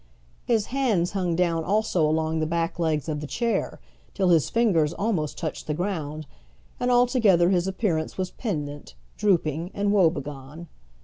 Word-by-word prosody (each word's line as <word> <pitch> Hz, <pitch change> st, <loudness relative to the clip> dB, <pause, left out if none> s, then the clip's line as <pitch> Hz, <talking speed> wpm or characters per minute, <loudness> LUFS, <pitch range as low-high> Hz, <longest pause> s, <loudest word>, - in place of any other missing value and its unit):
His 225 Hz, -3 st, +1 dB
hands 220 Hz, -11 st, +1 dB
hung 180 Hz, -4 st, -1 dB
down 165 Hz, -2 st, +1 dB
also 200 Hz, -2 st, +1 dB
along 160 Hz, +1 st, 0 dB
the 155 Hz, -, 0 dB
back 165 Hz, +1 st, -2 dB
legs 160 Hz, -3 st, 0 dB
of 150 Hz, -2 st, -2 dB
the 150 Hz, -, -6 dB
chair, 235 Hz, -, -1 dB, 0.4 s
till 190 Hz, -2 st, +2 dB
his 165 Hz, -4 st, +3 dB
fingers 175 Hz, -10 st, +2 dB
almost 180 Hz, -7 st, -2 dB
touched 160 Hz, -3 st, -5 dB
the 150 Hz, -, -1 dB
ground, 155 Hz, -4 st, -3 dB, 0.5 s
and 245 Hz, -, 0 dB
altogether 240 Hz, -8 st, +4 dB
his 180 Hz, -1 st, +1 dB
appearance 185 Hz, -5 st, -1 dB
was 185 Hz, -1 st, -2 dB
pendent, 145 Hz, -, -5 dB, 0.2 s
drooping, 170 Hz, -4 st, +1 dB
and 200 Hz, 0 st, +1 dB
wobegone. 150 Hz, -4 st, -1 dB
170 Hz, 150 wpm, -25 LUFS, 155-200 Hz, 0.5 s, altogether